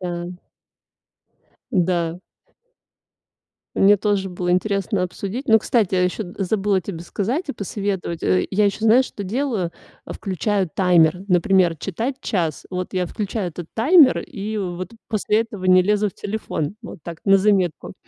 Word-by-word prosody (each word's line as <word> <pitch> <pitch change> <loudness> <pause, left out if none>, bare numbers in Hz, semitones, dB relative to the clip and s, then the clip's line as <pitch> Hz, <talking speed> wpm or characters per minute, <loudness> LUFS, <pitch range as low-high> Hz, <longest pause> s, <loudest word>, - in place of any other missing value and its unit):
Да. 175 0 -4 1.4
Да. 175 -4 0 1.6
Мне 205 +1 +6
тоже 200 -1 0
было 180 0 -1
интересно 195 0 0
обсудить. 200 +9 -5
Ну, 220 - +7
кстати, 215 -4 +1
я 180 - +3
ещё 180 +4 -1 0.2
забыла 195 0 +1
тебе 175 -2 -7
сказать 230 - -3
и - - -1
посоветовать, 195 -5 -4
э. 90 0 +2
Я 205 +2 +3
ещё, 200 - -1
знаешь, 240 +4 +5
что 205 - -7
делаю? 215 -5 -2 0.3
А, - - -7
включаю 195 0 -1
таймер, 180 -1 +3
например, 180 -2 +3
читать 225 - -3
час. 165 - -2
Вот 180 +1 -4
я 185 -1 +1
включаю 200 0 -3
этот 170 0 -8
таймер 280 +4 +6
и 215 -3 -5
вот 185 -1 -4 0.2
после 215 0 +1
этого 215 -4 -6
не 185 0 +6
лезу 210 +2 +1
в - - -13
телефон. 205 -4 -4
Вот 220 - -9
так 170 -2 -7
на 195 -1 +6
заметку. 190 -4 +1
195 Hz, 150 wpm, -21 LUFS, 180-210 Hz, 1.6 s, Ну